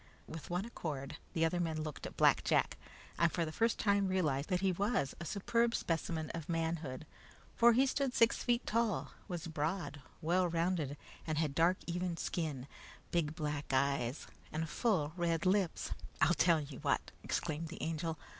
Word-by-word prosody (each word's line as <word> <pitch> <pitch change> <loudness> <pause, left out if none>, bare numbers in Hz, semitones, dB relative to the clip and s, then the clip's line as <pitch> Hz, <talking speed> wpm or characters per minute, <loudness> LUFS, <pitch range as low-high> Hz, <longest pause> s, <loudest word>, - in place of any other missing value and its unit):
With 160 -2 -8
one 180 +3 -1
accord 150 - -5 0.2
the 165 -2 +3
other 175 +2 0
men 160 -2 -1
looked 155 -2 -5
at - - -12
Black - - +5
Jack, - - +2 0.4
and 170 -1 +4
for 170 - 0
the 155 - -4
first 230 +7 +1
time 200 -1 +3
realized 155 -7 0
that 180 -1 +1
he 195 -1 +3
was 195 - 0
a 170 - -5
superb 230 +5 +1
specimen 160 -1 -1
of 165 -1 -6
manhood, 165 -4 -2 0.5
for 235 0 +7
he 260 +4 +5
stood 275 -1 0
six 230 0 +5
feet 240 0 +1
tall, 230 -2 0 0.2
was 175 -2 -4
broad, 155 -2 -2 0.2
well 175 +3 +2
rounded, 165 -4 0 0.3
and 155 -1 0
had 155 -3 +1
dark, 170 +5 +4
even 175 0 -2
skin, 150 -9 -2 0.5
big 160 -3 0
black 150 -3 -3
eyes, 135 -1 +1 0.3
and 160 +1 -2
full 170 -11 +1
red 170 -1 0
lips. 190 -2 +1 0.3
"I'll 155 +2 +5
tell 170 +1 +4
you 145 -3 -7
what!" - - 0
exclaimed 160 0 -2
the 170 - -7
Angel. 165 0 -2
165 Hz, 175 wpm, -35 LUFS, 155-185 Hz, 0.5 s, for